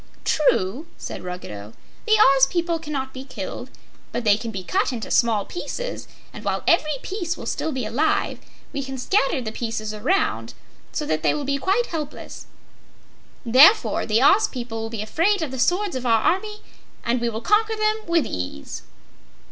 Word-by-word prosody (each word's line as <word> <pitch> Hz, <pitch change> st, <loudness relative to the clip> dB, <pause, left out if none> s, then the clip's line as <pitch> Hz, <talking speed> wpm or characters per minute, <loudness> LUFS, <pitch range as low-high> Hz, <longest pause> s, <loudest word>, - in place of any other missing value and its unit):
"True," 275 Hz, -, +1 dB
said -, -, -7 dB
Ruggedo. 110 Hz, -, -7 dB, 0.3 s
"The 435 Hz, -, +4 dB
Oz 270 Hz, -6 st, +6 dB
people 340 Hz, +2 st, -1 dB
cannot 280 Hz, -4 st, -4 dB
be 260 Hz, -, -7 dB
killed, 270 Hz, -, -7 dB, 0.4 s
but 245 Hz, -, -3 dB
they 210 Hz, -2 st, +5 dB
can 230 Hz, +2 st, -5 dB
be 195 Hz, -4 st, -5 dB
cut 380 Hz, -, 0 dB
into 235 Hz, -3 st, -5 dB
small 225 Hz, -4 st, +3 dB
pieces, -, -, -5 dB, 0.3 s
and -, -, -9 dB
while -, -, -1 dB
every 305 Hz, -4 st, +3 dB
piece 350 Hz, -4 st, -3 dB
will -, -, -8 dB
still 320 Hz, -, -2 dB
be 260 Hz, -5 st, -3 dB
alive, 255 Hz, +9 st, 0 dB, 0.3 s
we 280 Hz, -, -2 dB
can 270 Hz, 0 st, -6 dB
scatter 275 Hz, -1 st, +1 dB
the 220 Hz, -3 st, -4 dB
pieces 225 Hz, -2 st, -4 dB
around 265 Hz, -, 0 dB, 0.4 s
so 300 Hz, -, -3 dB
that 155 Hz, -, -1 dB
they -, -, +2 dB
will 295 Hz, -2 st, -3 dB
be 280 Hz, 0 st, 0 dB
quite 395 Hz, -, +2 dB
helpless. 305 Hz, -6 st, -6 dB, 1.0 s
Therefore, 285 Hz, -, +6 dB
the 225 Hz, +3 st, +3 dB
Oz 405 Hz, +9 st, +6 dB
people 235 Hz, -3 st, -5 dB
will 225 Hz, -, -4 dB
be 225 Hz, -2 st, -4 dB
afraid 340 Hz, -, +1 dB
of 295 Hz, -, -4 dB
the 265 Hz, -, -5 dB
swords 360 Hz, +8 st, +1 dB
of 255 Hz, -1 st, -3 dB
our 225 Hz, -2 st, +3 dB
army, 420 Hz, +4 st, 0 dB, 0.4 s
and 235 Hz, +1 st, +1 dB
we 235 Hz, -, +1 dB
will 220 Hz, -1 st, -4 dB
conquer 435 Hz, -, +2 dB
them 430 Hz, 0 st, +1 dB
with 335 Hz, -5 st, +2 dB
ease." 90 Hz, -6 st, -5 dB
270 Hz, 180 wpm, -23 LUFS, 225-345 Hz, 1.0 s, Oz